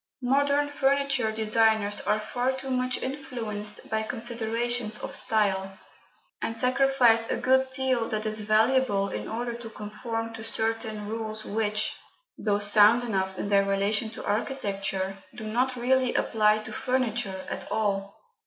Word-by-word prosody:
Modern 285 +3 +2
furniture 275 -4 +1
designers 220 -1 +2
are 215 - +2
far 245 +4 -1
too 265 0 -5
much 255 0 0
influenced 225 -6 -4
by 220 0 -1
considerations 230 0 -1
of - - -6
style, 195 -3 0 0.6
and 225 - -2
sacrifice 250 -2 +4
a - - 0
good 260 +1 +3
deal 260 -4 +1
that 215 0 -2
is 215 0 -1
valuable 215 -1 +2
in - - -5
order 235 +1 -3
to 235 -1 -8
conform 225 +2 -5
to 225 -1 -8
certain 225 -1 -2
rules 220 0 -4
which, 215 0 -1 0.4
though 205 -2 0
sound 205 +3 +5
enough 190 -4 -2
in 200 - -3
their 200 -1 +4
relation 200 +3 +1
to 220 - -9
architecture, 195 -4 -2 0.2
do 220 -2 -7
not 250 +4 0
really 255 +1 +1
apply 215 -1 +2
to - - -8
furniture 245 -7 -1
at - - -5
all. 200 -2 -1
225 Hz, 145 wpm, -27 LUFS, 210-250 Hz, 0.6 s, sound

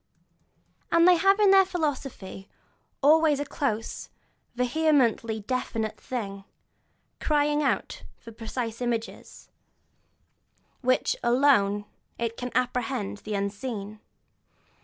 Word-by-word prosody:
And 335 +1 +5
they 365 - +7
have 390 +3 +4
their 390 -2 +6
philosophy, 275 - -4 0.5
always 305 0 +5
a 290 - -2
close, 230 -5 -3 0.5
vehemently 250 -4 +1
definite 225 -1 -3
thing, 200 -6 -5 0.8
crying 295 0 +1
out 275 - -1 0.2
for 230 - -12
precise 225 +1 -5
images, 235 -2 -5 1.3
by 255 - -11
which 255 - +2
alone 235 -5 +3 0.3
it 230 -1 -2
can 250 +1 -5
apprehend 245 - -1
the 215 -1 -5
unseen. 200 +1 -4
250 Hz, 95 wpm, -26 LUFS, 220-290 Hz, 1.3 s, they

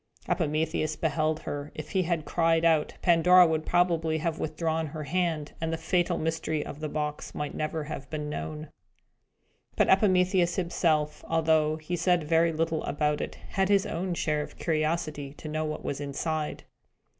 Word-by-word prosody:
Epimetheus 155 -1 0
beheld 155 0 0
her. 145 0 -5
If 155 0 -7
he 190 - +2
had 170 -3 -1
cried 165 +1 +2
out, 160 -2 +3
Pandora 180 +1 +7
would 160 -1 -1
probably 165 -3 +2
have 165 0 -2
withdrawn 160 0 -1
her 155 +1 -6
hand, 160 -1 -1
and 160 0 -1
the 165 - -1
fatal 175 +1 +1
mystery 160 -1 -1
of 145 - -8
the 155 -1 -3
box 150 0 -4
might 150 -1 -3
never 155 0 -2
have 145 -2 -7
been 150 -1 -4
known. 150 0 -5 1.1
But - - +3
Epimetheus 185 -2 +4
himself, 160 -4 0
although 160 -1 +2
he 160 +3 -4
said 175 -1 +2
very 165 +2 +3
little 160 0 -1
about 150 0 0
it, - - -5
had 190 0 0
his 200 -1 +4
own 175 +1 -2
share 150 -2 0
of - - -8
curiosity 155 -3 -1
to 155 - -9
know 155 +1 -2
what 155 0 -5
was 140 - -3
inside. 150 +2 -3
160 Hz, 165 wpm, -28 LUFS, 155-170 Hz, 1.1 s, Pandora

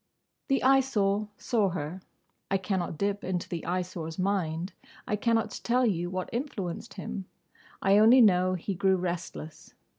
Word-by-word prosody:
The 270 -1 +1
Eyesore 215 -6 +3
saw 215 -6 +1
her. 170 +1 -5 0.5
I 195 - +2
cannot 185 -4 -2
dip 200 +2 -1
into 180 -2 -2
the 170 -2 -4
Eyesore's 175 -2 -3
mind. 185 -2 -1 0.3
I 210 - +1
cannot 225 +1 +1
tell 250 +1 +3
you 175 -5 0
what 185 0 -3
influenced 230 - -4
him. 195 0 -5 0.6
I 195 +1 +5
only 230 +4 +7
know 185 -5 +5
he 185 +3 -3
grew 190 +1 +2
restless. 175 -3 -5
190 Hz, 145 wpm, -28 LUFS, 180-215 Hz, 0.6 s, only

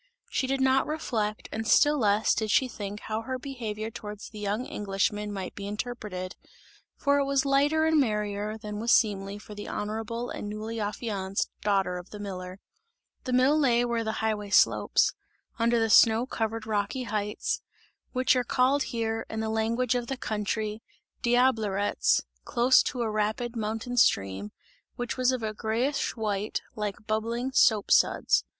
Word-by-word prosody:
She 260 - 0
did 270 0 0
not 265 0 +3
reflect 220 -9 -2
and 220 0 -3
still 295 +4 +5
less 210 -1 +3
did 215 0 -1
she 265 +3 +3
think 205 -3 -6
how 220 0 -3
her 260 +3 -4
behaviour 225 -5 -5
towards 210 -1 -8
the 215 - -10
young 210 +4 -2
Englishman 205 +1 -1
might 190 -2 -5
be 200 -1 -6
interpreted; 210 -4 -5 0.6
for 285 0 +2
it 280 - +1
was 275 0 +1
lighter 290 +3 +3
and 320 -1 +4
merrier 210 -3 -1
than 210 -1 -6
was 230 +2 +1
seemly 200 -2 +2
for 210 0 -11
the 205 0 -7
honourable 225 +3 -3
and 205 - -5
newly 220 +2 -5
affianced 205 -2 -2
daughter 195 -3 +1
of 180 - -12
the 210 - -8
miller. 185 -2 -6 0.7
The 255 - -2
mill 260 +4 +4
lay 245 -4 +3
where 235 -1 -1
the 220 0 -2
highway 210 -2 -1
slopes - - +4 0.5
under 235 +1 +3
the 225 - +2
snow 225 +2 +6
covered 225 -3 -3
rocky 215 +4 -1
heights 210 -2 -2 0.5
which 255 0 +3
are 250 - +2
called 255 +3 +2
here, 225 -1 -2
in 220 - -4
the 220 0 -1
language 225 +3 +1
of 245 -1 -2
the 270 - -3
country 215 0 -2 0.4
"Diablerets" 225 -5 +2 0.2
close 245 +2 +4
to 245 -2 -2
a 220 - -1
rapid 215 +3 -1
mountain 225 +2 -3
stream, 100 - +2 0.4
which 245 -1 -3
was 255 0 +2
of 255 -3 -2
a 215 -1 -2
greyish 235 +7 -1
white, 210 -2 -2
like 210 -1 -4
bubbling 230 +4 -1
soap 220 -5 +4
suds. - - +4
220 Hz, 165 wpm, -28 LUFS, 210-245 Hz, 0.7 s, snow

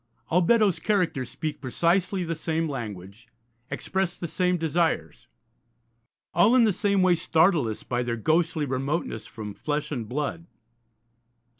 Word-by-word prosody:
All 180 +3 +3
Beddoes' 210 0 +3
characters 175 - 0
speak 155 +3 -5
precisely 175 +7 +1
the 165 -1 -2
same 160 0 -1
language, 105 - -7 0.4
express 180 +5 -2
the - - -5
same 180 +2 +1
desires; 160 - -1 1.1
all 225 +5 +5
in 250 - +6
the 215 -3 +3
same 200 0 +1
way 185 -1 +5
startle 165 -3 +3
us 110 - -5
by 120 -1 -1
their 120 -1 -2
ghostly 160 +4 +1
remoteness 135 -4 -2
from 110 -3 -7
flesh 150 +7 -3
and 120 -7 -4
blood. 150 +5 -3
160 Hz, 140 wpm, -26 LUFS, 125-180 Hz, 1.1 s, in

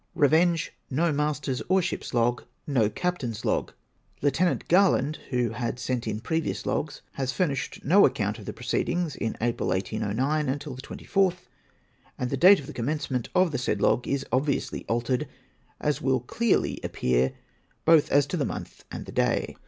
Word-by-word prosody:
Revenge. 165 +3 +3 0.2
No 165 +5 +1
Master's 145 -3 -1
or 190 0 +5
ship's 175 - -3
log. 120 0 +1 0.2
No 120 -8 +2
Captain's 120 -6 -3
log. - - 0 0.5
Lieut. 155 +5 +1
Garland, 170 -6 +3
who 125 -4 0
had 120 +1 -3
sent 125 -2 -2
in 110 0 -2
previous 160 +5 -2
logs 150 -1 -2 0.2
has 130 -1 0
fur 185 - +1
nished 135 -2 -4
no 190 +8 +6
account 105 +1 -2
of 105 - -10
the - - -5
j^i'oceedings 160 +6 -1
in 115 - -3
April 120 +1 -1
1809 110 +10 0
until 140 0 -3
the 130 - -8
24th, 185 +3 -1 0.7
and 125 -1 -2
the - - +1
date 185 +8 +7
of 140 - -8
the - - -8
commencement 130 -1 -2
of 180 -2 +4
the 135 - -2
said 125 - -1
log 125 - +2
is 140 0 -1
obviously 135 +3 0
altered, 125 +5 0 0.5
as 150 -1 0
will 130 -2 +1
clearly 225 - 0
appear 65 +1 +1 0.5
both 160 -2 +5
as 145 0 +5
to 160 - -4
the 150 - +1
month - - -6
and - - -6
the - - -9
day. - - 0
135 Hz, 170 wpm, -26 LUFS, 120-160 Hz, 0.7 s, date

